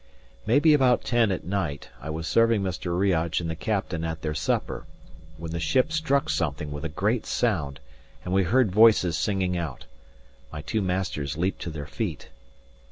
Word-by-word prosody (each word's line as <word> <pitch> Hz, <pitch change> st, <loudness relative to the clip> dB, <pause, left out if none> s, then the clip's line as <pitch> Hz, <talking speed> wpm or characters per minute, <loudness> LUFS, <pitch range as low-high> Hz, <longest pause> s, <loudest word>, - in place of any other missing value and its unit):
Maybe 145 Hz, +7 st, +5 dB
about 130 Hz, -4 st, +4 dB
ten 120 Hz, -4 st, +2 dB
at 95 Hz, -, -2 dB
night, 90 Hz, -7 st, -3 dB
I 75 Hz, -, -6 dB
was 80 Hz, +1 st, -4 dB
serving 115 Hz, +1 st, +3 dB
Mr. 90 Hz, -1 st, -2 dB
Riach 85 Hz, -4 st, +1 dB
and 85 Hz, -, -4 dB
the 80 Hz, -, -3 dB
captain 95 Hz, -3 st, -2 dB
at 80 Hz, -1 st, -4 dB
their 75 Hz, -1 st, -1 dB
supper, 75 Hz, -, -2 dB, 0.5 s
when 80 Hz, 0 st, -6 dB
the 85 Hz, -, -3 dB
ship 130 Hz, -, +2 dB
struck 155 Hz, -3 st, +1 dB
something 75 Hz, -1 st, -2 dB
with 75 Hz, +1 st, -6 dB
a 80 Hz, -, -2 dB
great 105 Hz, +9 st, -1 dB
sound, 80 Hz, -, -1 dB, 0.5 s
and 90 Hz, -, -2 dB
we 95 Hz, -, +4 dB
heard 110 Hz, +3 st, +3 dB
voices 105 Hz, -5 st, +5 dB
singing 95 Hz, -1 st, 0 dB
out. 80 Hz, -7 st, -4 dB, 0.7 s
My 75 Hz, -, -7 dB
two 110 Hz, +6 st, -1 dB
masters 90 Hz, -7 st, -2 dB
leaped 90 Hz, +4 st, -1 dB
to -, -, -4 dB
their 75 Hz, -3 st, -6 dB
feet. -, -, -4 dB
90 Hz, 175 wpm, -26 LUFS, 80-110 Hz, 0.7 s, Maybe